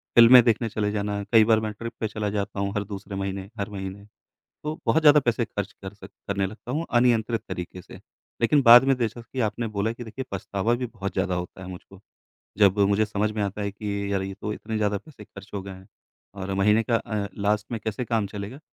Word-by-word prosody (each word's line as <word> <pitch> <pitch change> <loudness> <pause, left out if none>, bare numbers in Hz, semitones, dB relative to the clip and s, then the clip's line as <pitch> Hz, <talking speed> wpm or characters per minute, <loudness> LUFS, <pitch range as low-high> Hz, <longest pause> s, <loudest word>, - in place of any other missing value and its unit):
फिल्में 120 +2 +10
देखने 115 0 +1
चले 105 -1 -1
जाना। 100 -1 -2
कई 115 -2 +7
बार 110 0 +4
मैं 110 -1 -3
ट्रिप 115 +3 -7
पे 110 - 0
चला 105 -1 -3
जाता 100 -1 -3
हूँ 100 0 -1
हर 105 - 0
दूसरे 100 0 -7
महीने, 95 0 -4
हर 100 +1 -2
महीने। 100 0 -7 0.6
तो 155 +1 -3
बहुत 160 - +3
ज़्यादा 150 -1 +7
पैसे 120 -3 0
ख़र्च 100 -2 -5
कर 95 +1 -6
स 105 - -13 0.2
करने 100 -1 0
लगता 110 +5 -7
हूँ 155 +5 -1
अनियंत्रित 120 -2 +2
तरीक़े 90 +1 -6
से। - - -13 0.5
लेक़िन 140 +5 +4
बाद 120 0 +9
में 135 0 +3
जैसा 120 -1 -2
कि 130 +3 -8
आपने 115 +2 -4
बोला 105 +1 -1
कि 120 +1 -8
देखिए 120 +4 -7
पछतावा 100 +3 -1
भी 125 +1 -3
बहुत 105 -5 -6
ज़्यादा 95 -1 0
होता 90 +1 -6
है - - -8
मुझको। 95 +1 -11 0.6
जब 100 -1 +5
मुझे 100 +2 +3
समझ 105 0 -1
में 105 -1 -2
आता 100 +1 -3
है 100 - -2
कि 100 -1 -3
यार 95 -1 0
ये 95 0 -5
तो 105 - -3
इतने 110 +1 -5
ज़्यादा 105 -1 +1
पैसे 105 0 -14
ख़र्च 100 0 -13
हो 100 - -2
गए 100 - -8
हैं 95 0 -13 0.5
और 95 -1 -5
महीने 105 +3 +3
का 115 +1 +1
अ, 105 -3 -3
लास्ट 105 +1 0
में 115 - -1
कैसे 110 +3 -2
काम 115 -3 0
चलेगा। 100 +6 -7
105 Hz, 230 wpm, -25 LUFS, 100-115 Hz, 0.6 s, फिल्में